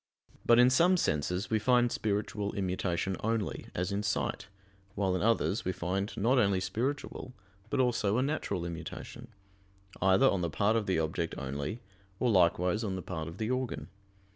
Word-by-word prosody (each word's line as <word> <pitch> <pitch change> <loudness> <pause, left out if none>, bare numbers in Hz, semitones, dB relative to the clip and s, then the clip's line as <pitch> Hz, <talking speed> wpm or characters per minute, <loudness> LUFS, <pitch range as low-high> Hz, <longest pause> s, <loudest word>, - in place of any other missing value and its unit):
But 120 - +7
in 125 +1 +6
some 175 +7 +5
senses 90 - -1
we 110 - +3
find 120 +1 +3
spiritual 105 0 -2
immutation 95 -1 -1
only, 110 -1 -2
as 90 +3 -1
in 100 +1 -1
sight: 105 -1 -2 0.5
while 95 -2 +1
in 90 - -1
others 110 -2 +1
we 95 - 0
find 95 +3 -2
not 125 +6 +3
only 100 -4 +3
spiritual 125 +4 -3 0.3
but - - -1
also 115 -4 +2
a 130 - +2
natural 100 - -2
immutation; 85 +8 -7 0.7
either 95 +8 +5
on 100 -7 +2
the 85 - -1
part 100 +8 +1
of 110 -2 0
the 95 - +1
object 80 +1 -1
only, 70 - -4 0.4
or 125 - +2
likewise 90 +2 +3
on 100 -3 -2
the 95 - -5
part 80 -4 -5
of 85 +3 -8
the 110 +3 -2
organ. 120 - -3
100 Hz, 170 wpm, -31 LUFS, 90-120 Hz, 0.7 s, But